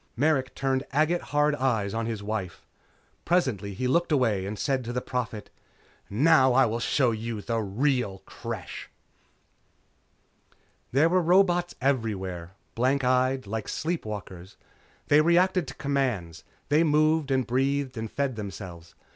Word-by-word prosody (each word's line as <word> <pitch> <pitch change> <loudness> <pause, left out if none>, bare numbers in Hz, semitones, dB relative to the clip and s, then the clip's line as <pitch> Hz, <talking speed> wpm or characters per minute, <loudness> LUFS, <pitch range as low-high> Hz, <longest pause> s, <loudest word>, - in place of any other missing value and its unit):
Merrick 135 -2 +1
turned 135 -1 0
agate 155 +4 +2
hard 150 0 +1
eyes 115 -8 0
on 115 0 -2
his 110 -3 -4
wife. 100 -4 -4 0.6
Presently 115 - 0
he 125 - -1
looked 170 +6 +1
away 110 -9 +1
and 105 +1 -5
said 135 0 0
to 120 - -5
the 125 - -1
Prophet. 120 -4 -4 0.6
"Now 130 +3 +4
I 135 +1 +5
will 115 +1 -2
show 125 0 +2
you 115 0 -4
the 115 +2 -2
real 110 -1 -1
Creche!" - - -7 2.0
There 140 +6 +4
were 180 +2 +3
robots 175 0 +3
everywhere 95 -10 -2 0.2
blank 130 +3 +1
eyed, 130 0 +2
like 110 +1 -4
sleep 170 +2 -2
walkers. 100 -3 -8 0.5
They 145 +1 +6
reacted 175 +1 +3
to 130 - -8
commands. 130 - -2 0.3
They 150 +3 +4
moved 155 -1 +2
and 130 -2 +1
breathed 135 +2 0
and 110 -1 -4
fed 140 -3 -1
themselves. 90 -5 -8
130 Hz, 140 wpm, -27 LUFS, 110-145 Hz, 2.0 s, They